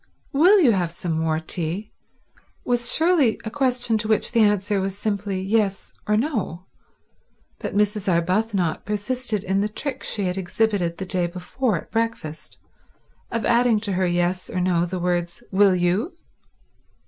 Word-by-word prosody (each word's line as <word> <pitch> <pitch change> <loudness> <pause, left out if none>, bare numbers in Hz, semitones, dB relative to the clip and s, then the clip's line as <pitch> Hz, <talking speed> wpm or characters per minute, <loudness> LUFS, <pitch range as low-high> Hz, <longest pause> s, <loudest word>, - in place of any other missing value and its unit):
"Will 360 +9 +6
you 285 -10 +5
have 180 -5 0
some 175 0 -5
more 160 0 0
tea?" 175 +5 -3 0.7
was 240 -1 +1
surely 320 -9 +3
a 220 - -4
question 250 -4 +1
to 215 - -2
which 215 -1 +1
the 235 - +2
answer 205 -2 +2
was 195 0 -3
simply 200 -2 -2
yes 195 0 0
or 210 0 +3
no; 215 - -2 0.9
but - - -5
Mrs. 210 -2 +1
Arbuthnot 180 +1 0
persisted 210 +1 -2
in 195 -1 0
the 210 - 0
trick 270 +5 -4
she 205 - -1
had 180 0 -1
exhibited 185 -2 0
the 190 - -4
day 180 -2 0
before 185 +5 -2
at - - -10
breakfast, 225 -9 -3 0.7
of 230 -1 -2
adding 235 -2 +3
to 205 -2 -2
her 185 0 +1
yes 175 +1 0
or 185 - -2
no 175 -1 +1
the 185 +1 -4
words, 175 +3 -2
"Will 195 0 +5
_you? 180 - +1
200 Hz, 160 wpm, -23 LUFS, 180-225 Hz, 0.9 s, Will